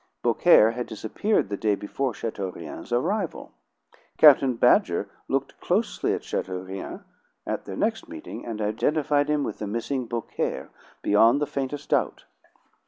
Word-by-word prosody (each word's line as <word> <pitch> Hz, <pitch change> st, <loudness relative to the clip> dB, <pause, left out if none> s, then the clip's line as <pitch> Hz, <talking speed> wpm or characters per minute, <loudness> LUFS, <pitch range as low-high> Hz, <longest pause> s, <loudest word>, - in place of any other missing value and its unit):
Beaucaire 110 Hz, +1 st, +5 dB
had 120 Hz, +1 st, -4 dB
disappeared 110 Hz, -, -1 dB
the 100 Hz, -, -3 dB
day 105 Hz, -1 st, +1 dB
before 130 Hz, +6 st, -3 dB
Chateaurien's 95 Hz, -6 st, -6 dB
arrival. 175 Hz, -, -1 dB, 0.7 s
Captain 135 Hz, -4 st, +7 dB
Badger -, -, +3 dB, 0.2 s
looked -, -, -2 dB
closely -, -, 0 dB
at -, -, -7 dB
Chateaurien 95 Hz, +1 st, -5 dB, 0.4 s
at -, -, -3 dB
their 95 Hz, -, -6 dB
next 230 Hz, +9 st, -1 dB
meeting, 320 Hz, 0 st, -8 dB
and 110 Hz, -2 st, -4 dB
identified 145 Hz, +7 st, +1 dB
him 150 Hz, -1 st, +1 dB
with -, -, -5 dB
the 105 Hz, -, -4 dB
missing 120 Hz, +4 st, -3 dB
Beaucaire 115 Hz, -1 st, -3 dB, 0.3 s
beyond 115 Hz, +6 st, +5 dB
the 150 Hz, -, +1 dB
faintest 140 Hz, 0 st, -4 dB
doubt. -, -, 0 dB
120 Hz, 135 wpm, -25 LUFS, 105-145 Hz, 0.7 s, Captain